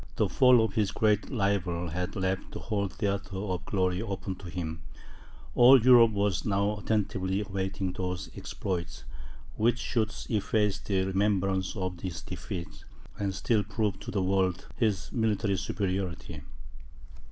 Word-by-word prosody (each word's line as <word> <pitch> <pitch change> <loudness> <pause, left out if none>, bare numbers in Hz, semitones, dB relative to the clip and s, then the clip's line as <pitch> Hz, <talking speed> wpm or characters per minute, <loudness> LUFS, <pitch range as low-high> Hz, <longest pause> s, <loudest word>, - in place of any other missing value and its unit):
The - - +2
fall 125 -3 +5
of - - -4
his 105 -4 +1
great 105 -1 +1
rival 95 -7 0
had 90 +3 -3
left 95 0 -2
the - - -5
whole 100 -3 -1
theatre 100 +1 -3
of 95 -3 -3
glory 95 -2 0
open 100 -3 -4
to 90 -2 -9
him; 80 -2 -4 0.7
all 125 +2 +8
Europe 120 -1 +7
was 100 -3 0
now 100 0 +1
attentively 100 -2 0
awaiting 95 -1 -3
those 90 0 -3
exploits, 85 -3 -4 0.5
which 120 +2 +3
should 110 -3 -1 0.2
efface 105 -2 +1
the 95 -2 0
remembrance 95 -1 0
of 95 -3 -3
his 90 -2 -5
defeat, 90 0 -7 0.4
and 100 -2 -1
still 110 0 +1
prove 105 0 -2
to - - -9
the 95 - 0
world 95 -1 +1
his 105 -5 0
military 110 -4 +1
superiority. 90 -3 -3
100 Hz, 140 wpm, -29 LUFS, 95-105 Hz, 0.7 s, all